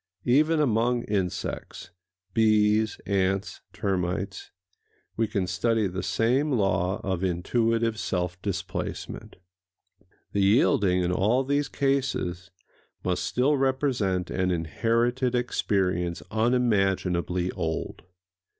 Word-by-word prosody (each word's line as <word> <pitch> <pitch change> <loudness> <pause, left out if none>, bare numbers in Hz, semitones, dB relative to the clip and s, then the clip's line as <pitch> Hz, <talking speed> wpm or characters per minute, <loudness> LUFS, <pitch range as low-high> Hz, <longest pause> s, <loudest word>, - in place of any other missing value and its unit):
Even 155 +6 +3
among 120 -3 +2
insects—bees, 95 +3 -1
ants, 95 0 -1
termites—we 95 +2 -4
can 100 -2 -1
study 105 +5 +1
the 95 0 -3
same 125 +9 +1
law 95 -5 +1
of 95 -1 -2
intuitive 115 +5 0
self 90 -2 -2
displacement. 100 -3 -5 1.0
The 100 - 0
yielding, 95 -3 +3
in 90 - 0
all 110 +8 +2
these 145 +1 0
cases, 135 -10 -1 0.5
must 90 -1 -1
still 130 +9 +1
represent 130 -9 0
an 95 -1 0
inherited 115 +9 0
experience 90 -7 0
unimaginably 95 -6 +1
old. 80 0 -4
100 Hz, 90 wpm, -26 LUFS, 90-120 Hz, 1.0 s, Even